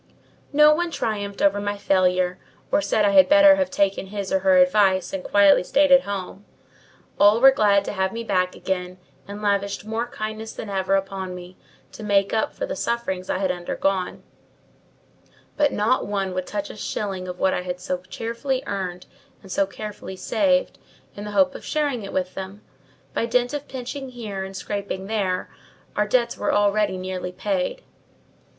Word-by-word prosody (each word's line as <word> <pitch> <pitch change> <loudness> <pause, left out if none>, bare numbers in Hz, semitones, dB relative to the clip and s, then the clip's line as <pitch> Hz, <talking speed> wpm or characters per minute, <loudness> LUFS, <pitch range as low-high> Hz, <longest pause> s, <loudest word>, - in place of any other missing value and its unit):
No 300 +1 +6
one 345 +2 -1
triumphed 205 -9 -3
over 200 0 +3
my 205 0 -2
failure, 185 -2 +1 0.3
or - - +3
said 210 +1 +1
I 200 - +3
had 190 -2 +6
better 295 -1 +7
have 280 -1 0
taken 195 -7 0
his 200 +1 -4
or 285 - +3
her 285 -1 +4
advice, 205 -9 +3
and 190 -1 -3
quietly 200 -2 +5
stayed 285 +8 +2
at 270 0 +7
home. 200 0 -5 0.8
All 205 +2 +6
were 270 +2 +8
glad 205 -5 +3
to - - -3
have 190 -1 0
me 230 0 -5
back 185 -4 0
again, 180 -1 -3 0.3
and 205 +1 -8
lavished 200 0 0
more 225 +2 -2
kindness 215 -1 -6
than 210 - -7
ever 195 0 +1
upon 195 -1 -3
me, 180 0 -10 0.4
to - - -11
make 200 -2 +1
up 220 - 0
for - - -3
the - - -4
sufferings 190 -6 -2
I - - 0
had 190 -1 0
undergone; 180 +1 -2 1.3
but 295 -1 +2
not 225 +5 +1
one 195 -2 -2
would 185 0 -3
touch 205 -1 -4
a - - -11
shilling 195 -3 -4
of 180 0 -6
what 190 - +2
I - - -1
had 180 0 -5
so 180 0 -3
cheerfully 235 +8 -3
earned 185 -3 -4 0.4
and 190 - -12
so 195 +1 +1
carefully 205 -1 -8
saved, 275 +8 +1 0.4
in 205 - -7
the 210 - -5
hope 275 -1 +4
of - - -9
sharing 290 -6 -1
it 195 - -7
with 185 -1 -2
them. 195 +2 -8 0.5
By 230 - -1
dint 245 +2 +1
of 290 -1 -4
pinching 265 +1 -6
here, 215 -6 -6
and 190 0 -7
scraping 200 -1 -4
there, 195 -3 -2 0.4
our 210 0 +1
debts 235 +1 +1
were - - 0
already 205 -1 +2
nearly 185 -1 -4
paid. 200 - -2
200 Hz, 185 wpm, -23 LUFS, 190-235 Hz, 1.3 s, were